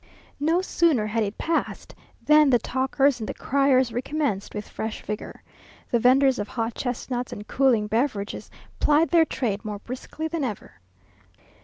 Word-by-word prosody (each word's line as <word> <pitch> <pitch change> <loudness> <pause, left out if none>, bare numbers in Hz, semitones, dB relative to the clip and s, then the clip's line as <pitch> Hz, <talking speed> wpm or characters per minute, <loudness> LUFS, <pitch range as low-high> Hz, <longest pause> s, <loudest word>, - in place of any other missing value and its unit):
No 325 +5 +2
sooner 325 - +2
had 220 +2 -1
it 205 0 -2
passed 330 0 -2 0.3
than 300 -1 +6
the 250 - +5
talkers 265 +3 +1
and 215 - -5
the - - -4
criers 265 -3 +2
recommenced 260 -4 -2
with 210 0 -5
fresh 220 0 -5
vigour. 210 0 -6 0.5
The 235 - +3
venders 260 +2 +4
of 205 - -3
hot 230 0 -3
chestnuts 245 0 -3
and 210 +1 -8
cooling 255 -6 +2
beverages 215 -1 -2 0.3
plied 300 +2 +3
their 335 -2 +5
trade 225 -8 -2
more 210 -2 -4
briskly 255 +8 -6
than 320 -1 -3
ever. 210 - -6
250 Hz, 155 wpm, -25 LUFS, 215-285 Hz, 0.5 s, than